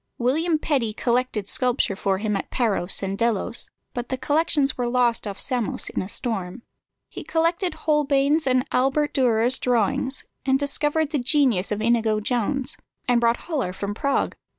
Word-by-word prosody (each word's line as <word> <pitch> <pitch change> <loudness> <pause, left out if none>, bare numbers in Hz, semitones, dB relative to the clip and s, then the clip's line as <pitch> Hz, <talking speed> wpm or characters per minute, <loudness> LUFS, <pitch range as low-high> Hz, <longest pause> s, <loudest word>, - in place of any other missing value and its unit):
William 310 +7 +1
Petty 265 -8 -1
collected 235 -3 -1
sculpture 250 -4 +1
for 195 0 0
him 210 +1 -1
at 195 - -4
Paros 200 -7 0
and 195 0 -2
Delos, 230 +1 -1 0.2
but 245 0 -5
the 260 - -2
collections 290 0 +1
were 245 -1 -2
lost 240 -2 +1
off 200 -1 -6
Samos 245 -6 0
in - - -2
a 185 - -6
storm. 220 -2 -1 0.4
He - - -8
collected 335 +1 0
Holbein's 295 0 +2
and 255 0 +2
Albert 270 +4 +1
Dürer's 245 -2 +2
drawings, 250 +2 0 0.3
discovered 295 +2 0
the 295 - 0
genius 245 - +2
of 210 +1 -2
Inigo 225 -2 +2
Jones, 250 +5 -1 0.3
and 245 -1 +3
brought 235 0 +2
Hollar 275 - -2
from 200 +2 -4
Prague. 280 +6 -1
250 Hz, 155 wpm, -23 LUFS, 220-280 Hz, 0.4 s, and